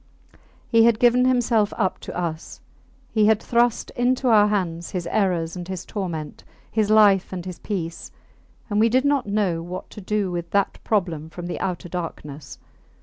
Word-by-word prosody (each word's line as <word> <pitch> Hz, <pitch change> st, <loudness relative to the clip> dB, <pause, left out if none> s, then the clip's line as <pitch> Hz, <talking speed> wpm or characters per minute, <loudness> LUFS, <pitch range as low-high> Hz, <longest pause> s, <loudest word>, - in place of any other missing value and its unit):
He 230 Hz, -1 st, +5 dB
had 235 Hz, -2 st, +4 dB
given 245 Hz, +2 st, +4 dB
himself 240 Hz, -4 st, +2 dB
up 190 Hz, -4 st, 0 dB
to -, -, -7 dB
us; 165 Hz, -2 st, -5 dB, 0.5 s
he 215 Hz, -2 st, +3 dB
had 220 Hz, -1 st, +4 dB
thrust 235 Hz, 0 st, +1 dB
into 250 Hz, +1 st, +1 dB
our 210 Hz, -2 st, +6 dB
hands 175 Hz, -5 st, -2 dB
his 180 Hz, -2 st, -4 dB
errors 175 Hz, -5 st, 0 dB
and 175 Hz, -1 st, -6 dB
his 185 Hz, -1 st, -5 dB
torment, 170 Hz, -7 st, -5 dB, 0.3 s
his 215 Hz, -2 st, +1 dB
life 205 Hz, -3 st, +5 dB
and 180 Hz, -2 st, -5 dB
his 180 Hz, -2 st, -7 dB
peace; 170 Hz, -5 st, -5 dB, 0.6 s
and 210 Hz, -2 st, 0 dB
we 225 Hz, +1 st, +4 dB
did 255 Hz, +4 st, +2 dB
not 280 Hz, -5 st, +1 dB
know 200 Hz, -5 st, 0 dB
what 175 Hz, +2 st, -7 dB
to 210 Hz, -, -9 dB
do 200 Hz, -1 st, -1 dB
with 170 Hz, -1 st, -4 dB
that 200 Hz, +1 st, 0 dB
problem 170 Hz, -7 st, -1 dB
from 175 Hz, +2 st, -8 dB
the 175 Hz, -, -4 dB
outer 180 Hz, -1 st, -3 dB
darkness. 155 Hz, -5 st, -7 dB
195 Hz, 175 wpm, -23 LUFS, 175-220 Hz, 0.6 s, our